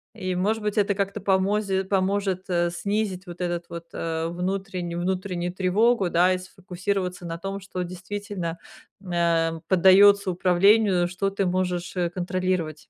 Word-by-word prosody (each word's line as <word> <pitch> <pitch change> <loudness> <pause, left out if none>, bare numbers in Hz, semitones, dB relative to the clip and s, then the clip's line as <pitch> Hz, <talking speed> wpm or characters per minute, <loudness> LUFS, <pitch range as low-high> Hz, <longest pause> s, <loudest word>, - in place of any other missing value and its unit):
И, 185 -4 -3
может 210 +4 0
быть, 210 0 -2
это 200 0 +3
как-то 200 0 -2
помози 195 0 +1
поможет, 190 -1 0
э, 175 -1 +1
снизить 200 +1 -2
вот 175 0 -9
этот 175 -1 -2
вот, 170 0 -7
э, 165 0 -2
внутренню 180 -1 -3
внутреннюю 180 -1 -2
тревогу, 195 +2 +2
да, 180 +2 +4
и - - 0
сфокусироваться 185 0 -4
на 165 0 -5
том, 195 +1 -4
что 185 -2 -5
действительно 185 -1 -5 0.4
н 180 - -8
а, 165 -1 +1
поддаётся 195 +2 +6
управлению, 185 +1 +3
что 195 +2 -2
ты 195 -1 -1
можешь, 180 0 -2
э, 175 -1 0
контролировать. 180 -3 -2
185 Hz, 150 wpm, -25 LUFS, 175-195 Hz, 0.4 s, поддаётся